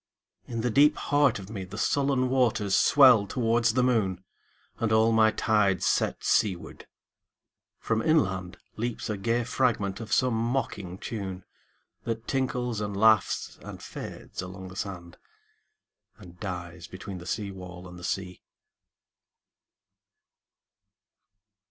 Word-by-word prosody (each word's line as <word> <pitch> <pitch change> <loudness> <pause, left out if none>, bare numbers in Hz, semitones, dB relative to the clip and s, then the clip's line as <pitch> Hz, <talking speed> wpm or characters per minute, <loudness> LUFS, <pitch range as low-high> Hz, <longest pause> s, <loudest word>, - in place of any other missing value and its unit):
In 115 -2 -3
the 125 +1 0
deep 145 +6 +5
heart 145 0 +2
of 95 - -8
meThe 100 -1 -7
sullen 135 +1 +1
waters 115 -6 +2
swell 125 -8 +6
towards 115 0 +1
the 130 - +3
moon, 100 -8 +1 0.6
And 115 -2 0
all 110 +1 +4
my 110 -1 +5
tides 105 -5 +1
set - - 0
seaward. 95 -5 0 0.9
From 110 -1 -1
inlandLeaps 110 - -1
a 105 - -3
gay 115 +4 0
fragment 110 -5 0
of 110 -2 -8
some 130 0 +3
mocking 110 -6 -2
tune, 95 -4 -6 0.6
That 115 0 -4
tinkles 125 -4 -1
and 100 -1 -3
laughs 110 +1 +2
and - - -9
fades - - -8
along 95 0 -8
the 90 - -11
sand, 90 -4 -6 1.0
And 90 0 -14
dies 90 -2 -6
between 95 -1 -8
the 85 - -10
seawall 90 -4 -5
and 90 0 -11
the - - -12
sea. 90 -1 -4
110 Hz, 120 wpm, -27 LUFS, 95-120 Hz, 1.0 s, swell